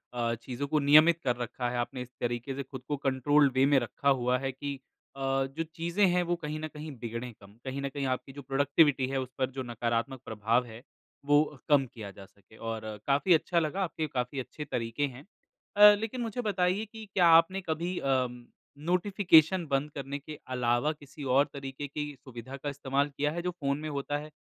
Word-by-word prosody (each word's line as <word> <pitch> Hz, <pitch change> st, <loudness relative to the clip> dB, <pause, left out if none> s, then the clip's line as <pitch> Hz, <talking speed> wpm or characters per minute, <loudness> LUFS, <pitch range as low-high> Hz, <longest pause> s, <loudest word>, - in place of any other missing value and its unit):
अ, 115 Hz, -1 st, 0 dB
चीज़ों 130 Hz, +3 st, -4 dB
को 155 Hz, +1 st, +2 dB
नियमित 155 Hz, +4 st, +6 dB
कर 125 Hz, -2 st, +1 dB
रखा 120 Hz, 0 st, -3 dB
है। 125 Hz, -, -3 dB
आपने 120 Hz, +1 st, -3 dB
इस 125 Hz, -, -7 dB
तरीके 120 Hz, +2 st, -2 dB
से 140 Hz, -, -3 dB
खुद 130 Hz, -1 st, -9 dB
को 145 Hz, -, 0 dB
कंट्रोल्ड 140 Hz, +1 st, +4 dB
वे 130 Hz, +1 st, +4 dB
में 140 Hz, -1 st, +4 dB
रखा 135 Hz, +3 st, -1 dB
हुआ 125 Hz, -1 st, +2 dB
है 135 Hz, 0 st, -2 dB
कि 140 Hz, +2 st, -5 dB, 0.4 s
अ, 135 Hz, -, -9 dB, 0.4 s
जो 165 Hz, -, 0 dB
चीज़ें 170 Hz, +4 st, +2 dB
हैं, 180 Hz, 0 st, +2 dB
वो 175 Hz, 0 st, 0 dB
कहीं 155 Hz, -2 st, -5 dB
न 155 Hz, -, -4 dB
कहीं 155 Hz, 0 st, -8 dB
बिगड़ें 115 Hz, +1 st, -5 dB
कम। 100 Hz, -1 st, -17 dB
कहीं 135 Hz, +1 st, -3 dB
न 140 Hz, -, -2 dB
कहीं 140 Hz, 0 st, -3 dB
आपकी 130 Hz, +1 st, -3 dB
जो 140 Hz, -, -8 dB
प्रोडक्टिविटी 140 Hz, 0 st, +3 dB
है, 135 Hz, 0 st, -1 dB
उस 130 Hz, -, -6 dB
पर 130 Hz, -1 st, 0 dB
जो 130 Hz, 0 st, -4 dB
नकारात्मक 120 Hz, +2 st, -2 dB
प्रभाव 110 Hz, +3 st, +1 dB
है, 115 Hz, 0 st, -11 dB, 0.4 s
वो 145 Hz, -1 st, +3 dB
कम 140 Hz, -2 st, +5 dB
किया 110 Hz, -4 st, -9 dB
जा 100 Hz, 0 st, -12 dB
सके, 100 Hz, +2 st, -22 dB
और 115 Hz, -1 st, -4 dB, 0.3 s
काफ़ी 145 Hz, +6 st, +4 dB
अच्छा 170 Hz, +1 st, +2 dB
लगा, 165 Hz, +5 st, -1 dB
आपके 160 Hz, -3 st, -3 dB
काफ़ी 125 Hz, 0 st, -3 dB
अच्छे 150 Hz, +4 st, -6 dB
तरीके 115 Hz, +2 st, -2 dB
हैं। 130 Hz, +2 st, -11 dB, 0.5 s
अ, 210 Hz, 0 st, +10 dB
लेकिन 230 Hz, +3 st, -4 dB
मुझे 230 Hz, +2 st, -3 dB
बताइए 200 Hz, -1 st, +1 dB
कि 220 Hz, 0 st, -10 dB
क्या 175 Hz, -3 st, +5 dB
आपने 190 Hz, +4 st, -2 dB
कभी 170 Hz, +3 st, -1 dB
अम, 125 Hz, -3 st, -1 dB, 0.3 s
नोटिफ़िकेशन 175 Hz, 0 st, +3 dB
बंद 145 Hz, +2 st, +1 dB
करने 140 Hz, 0 st, -5 dB
के 150 Hz, +1 st, -10 dB, 0.2 s
अलावा 120 Hz, +4 st, +2 dB
किसी 145 Hz, 0 st, -12 dB
और 135 Hz, +2 st, +4 dB
तरीके 140 Hz, 0 st, -6 dB
की 145 Hz, 0 st, -5 dB
सुविधा 130 Hz, +1 st, -9 dB
का 145 Hz, -, -4 dB
इस्तेमाल 140 Hz, 0 st, -1 dB
किया 150 Hz, +1 st, +1 dB
है, 175 Hz, -, -3 dB
जो 180 Hz, +1 st, -2 dB
फ़ोन 140 Hz, -4 st, -2 dB
में 155 Hz, -, -4 dB
होता 145 Hz, 0 st, -2 dB
है? 150 Hz, +1 st, -8 dB
140 Hz, 210 wpm, -29 LUFS, 125-155 Hz, 0.5 s, अ